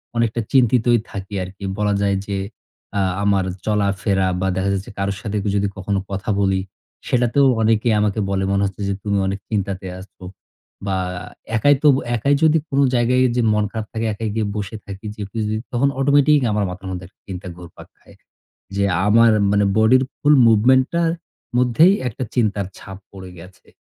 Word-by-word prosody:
অনেকটা 115 0 0
চিন্তিতই 120 -2 +3
থাকি 100 -1 -7
আরকি। 95 +2 -10
বলা 105 -1 +1
যায় 100 -1 +1
যে 100 -1 -2 0.6
আ - - +2 0.2
আমার 100 -2 +2 0.2
চলাফেরা 100 -2 0
বা 95 - 0
দেখা 95 +1 0
যাচ্ছে 95 +1 -4
কারো 100 0 -1
সাথে 105 -1 -3 0.2
যদি 100 0 +1
কখনো 100 +1 -1
কথা 100 +2 -4
বলি, 95 -1 +1 0.5
সেটাতেও 125 +3 +3
অনেকে 110 +1 +2
আমাকে 105 +1 0
বলে 95 -1 0
মনে 100 0 +1
হচ্ছে 100 +1 -5
যে, 100 - 0
"তুমি 100 -1 0
অনেক 100 +1 -3
চিন্তাতে 100 -3 -2
আছো।" 95 0 -15 0.6
বা 95 -1 -1 0.6
একাই 145 +6 +4
তো - - +5 0.3
একাই 140 +5 +2
যদি 160 0 +5
কোনো 140 0 +2
জায়গায় 125 +2 +3
যে 125 - +2
মন 105 0 +1
খারাপ 110 -2 -4
থাকে 115 0 -2
একাই 110 +1 -4
গিয়ে 110 -2 0
বসে 105 +1 -4
থাকি 100 +1 -9
যেপুযি 105 +1 -3 0.2
তখন 125 +3 +1
অটোমেটিক 145 +2 +4
আমার 105 0 0
মাথার 95 +1 -8
মধ্যে 90 -1 -6
একটা 95 - -30
চিন্তা 95 -1 -6
ঘুরপাক 90 -2 -13
খায়। - - -20 0.6
যে 100 - +1 0.2
আমার 115 +2 +5 0.2
মানে 105 0 +3
বডির 125 +4 +5
ফুল 150 0 +3
মুভমেন্ট 125 +4 +4
টার 170 -1 +2 0.5
মধ্যেই 125 - +5
একটা 125 +2 -4
চিন্তার 105 -5 +1
ছাপ 95 -1 -10
পড়ে 95 -2 -10
গেছে। 95 +2 -15
105 Hz, 170 wpm, -20 LUFS, 100-120 Hz, 0.6 s, তো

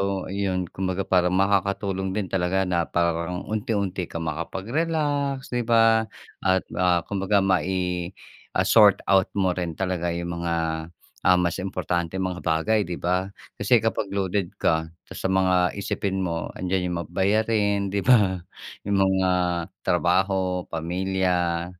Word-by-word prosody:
So 100 -1 -2
yun, 95 -3 -2
kumbaga, 95 0 -2
parang 90 -1 +2
makakatulong 95 0 0
din 100 -4 -3
talaga 95 0 +1
na 85 -3 0
parang 85 +1 -1
unti-unti 100 -4 -1
ka 85 - -6
makapag-relax, 140 - -2
di 120 -2 -2
ba? 115 -1 +4 0.3
At, 95 0 +2 0.2
ah, 90 -2 +3
kumbaga 100 0 +1
mai 90 -1 0 0.5
ah, - - +3
sort - - +6
out 95 -1 +5
mo 95 -2 +2
rin 90 -2 -3
talaga 85 -1 -2
yung 85 0 -4
mga, 85 -1 -1 0.7
ah, 90 - +7
mas 90 -1 0
importanteng 90 -1 -2
mga 90 -1 -2
bagay, 90 +6 +1
di 90 - -4
ba? 90 +3 -1 0.2
Kasi 110 +3 +3
kapag 105 -3 -1
loaded 95 -1 -1
ka 80 0 +2 0.2
sa - - -4
mga 90 -1 +2
iisipin 95 -1 -2
mo 85 -2 -2
'andiyan 90 0 -1
yung 90 -1 -2
mga 80 - -13
bayarin, 100 0 +1
di 100 - -1
ba? 100 -4 +4 0.5
Yung 100 -1 +2
mga 95 -1 +2 0.5
trabaho, 90 +1 +1
pamilya, 90 0 -1
95 Hz, 140 wpm, -24 LUFS, 90-100 Hz, 0.7 s, ah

